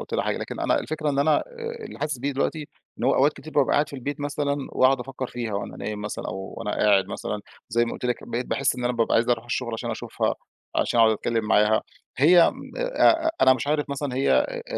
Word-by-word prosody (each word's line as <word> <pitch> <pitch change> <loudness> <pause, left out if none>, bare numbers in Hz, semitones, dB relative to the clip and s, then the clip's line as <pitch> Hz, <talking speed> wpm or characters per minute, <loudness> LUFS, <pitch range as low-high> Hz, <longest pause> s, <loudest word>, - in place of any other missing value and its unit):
قُلت - - -9
لها - - 0
حاجة، - - -1
لكن - - -6
أنا - - +2
الفكرة 155 -1 -2
إن 140 - -1
أنا 150 +2 +4
آآ 470 -2 -6
اللي - - -9
حاسِس 150 -3 -2
بيه 140 +3 -1
دلوقتي 150 +2 -2 0.3
إن - - -3
هو - - +4
أوقات 145 +3 +4
كتير 155 - -11
بابقى 140 -3 +3
قاعد 145 0 +2
في 140 - -8
البيت 145 +3 -5
مثلًا 145 0 -1 0.2
وأقعد 130 0 +4
أفكّر 130 +1 -5
فيها 120 -4 -4
وأنا 100 - -4
نايم 105 -1 -5
مثلًا 105 0 -5
أو 95 0 -6
وأنا 110 -2 -4
قاعد 100 -3 +3
مثلًا، 105 +1 -4 0.3
زي 120 +1 +2
ما 115 - -4
قُلت - - -7
لِك 125 -1 -1
بقيت 120 +1 -2
باحِس 135 -1 0
إن 125 - -4
أنا 125 - +1
بابقى 115 -1 +1
عايز 115 +1 +3
أروح 120 -1 +1
الشُغل 120 0 -3
عشان 115 - -3
أشوفها، - - -2 0.4
عشان 120 - +2
أقعد 110 -1 +6
أتكلّم 115 +1 -1
معاها. 105 0 +3 0.3
هي 165 +6 +6
م - - -11
آآ - - +3
أ 325 +1 -1
أنا 130 - +8
مش 130 +1 -4
عارف 150 0 0
مثلًا 140 -2 -3
هي 135 +2 +1
آآ 65 - +1
130 Hz, 245 wpm, -25 LUFS, 115-150 Hz, 0.4 s, أنا